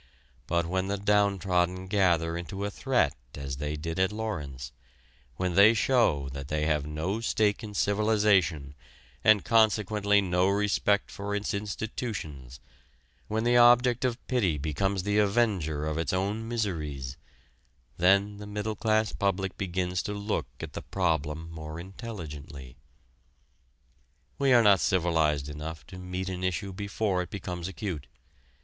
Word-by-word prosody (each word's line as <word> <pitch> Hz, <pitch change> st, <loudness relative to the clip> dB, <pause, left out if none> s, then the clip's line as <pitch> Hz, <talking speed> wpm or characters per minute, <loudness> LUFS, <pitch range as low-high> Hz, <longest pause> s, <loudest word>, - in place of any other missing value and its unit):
But 85 Hz, 0 st, +1 dB
when 95 Hz, +2 st, -1 dB
the 100 Hz, +1 st, -1 dB
downtrodden 95 Hz, -3 st, +1 dB
gather 85 Hz, -4 st, +2 dB
into 85 Hz, +4 st, -4 dB
a 100 Hz, -, -3 dB
threat 120 Hz, -, +1 dB, 0.2 s
as 70 Hz, -2 st, -5 dB
they 75 Hz, +1 st, -3 dB
did 80 Hz, +3 st, -4 dB
at 95 Hz, +1 st, +2 dB
Lawrence, 75 Hz, -, -5 dB, 0.6 s
when 90 Hz, +3 st, -1 dB
they 105 Hz, +5 st, +7 dB
show 110 Hz, -, +2 dB
that 70 Hz, 0 st, -7 dB
they 75 Hz, 0 st, -1 dB
have 75 Hz, -2 st, 0 dB
no 80 Hz, +8 st, -2 dB
stake 110 Hz, -1 st, +1 dB
in 105 Hz, -1 st, -7 dB
civilization 100 Hz, -9 st, +2 dB, 0.5 s
and 110 Hz, -2 st, +5 dB
consequently 105 Hz, -2 st, +3 dB
no 90 Hz, -1 st, +2 dB
respect 100 Hz, 0 st, +1 dB
for 100 Hz, +1 st, -4 dB
its 105 Hz, 0 st, -2 dB
institutions, 100 Hz, -, -5 dB, 0.7 s
when 110 Hz, +1 st, -1 dB
the 120 Hz, +1 st, +4 dB
object 120 Hz, 0 st, +5 dB
of 125 Hz, -2 st, 0 dB
pity 100 Hz, -, +1 dB
becomes 90 Hz, +7 st, -1 dB
the 105 Hz, +1 st, +1 dB
avenger 100 Hz, -8 st, +1 dB
of 80 Hz, +1 st, -2 dB
its 85 Hz, -, -1 dB
own 100 Hz, +4 st, -1 dB
miseries, 75 Hz, -, -3 dB, 0.8 s
then 100 Hz, +3 st, +3 dB
the 105 Hz, 0 st, -8 dB
middle 105 Hz, +1 st, -3 dB
class 110 Hz, -1 st, +1 dB
public 95 Hz, -1 st, -1 dB
begins 90 Hz, -1 st, -2 dB
to 105 Hz, -, -4 dB
look 100 Hz, -8 st, -2 dB
at -, -, -7 dB
the -, -, -5 dB
problem 80 Hz, 0 st, -1 dB
more 80 Hz, 0 st, -7 dB
intelligently. 75 Hz, -, -8 dB, 1.6 s
We 140 Hz, -1 st, +3 dB
are 120 Hz, -2 st, +7 dB
not 100 Hz, -3 st, +6 dB
civilized 80 Hz, -5 st, +1 dB
enough 75 Hz, 0 st, -7 dB
to 90 Hz, +3 st, -10 dB
meet 90 Hz, +1 st, -4 dB
an 95 Hz, -1 st, -4 dB
issue 95 Hz, +2 st, -2 dB
before 100 Hz, -1 st, -1 dB
it 90 Hz, -, -6 dB
becomes 90 Hz, -4 st, -5 dB
acute. 95 Hz, -, -5 dB
95 Hz, 140 wpm, -28 LUFS, 80-105 Hz, 1.6 s, they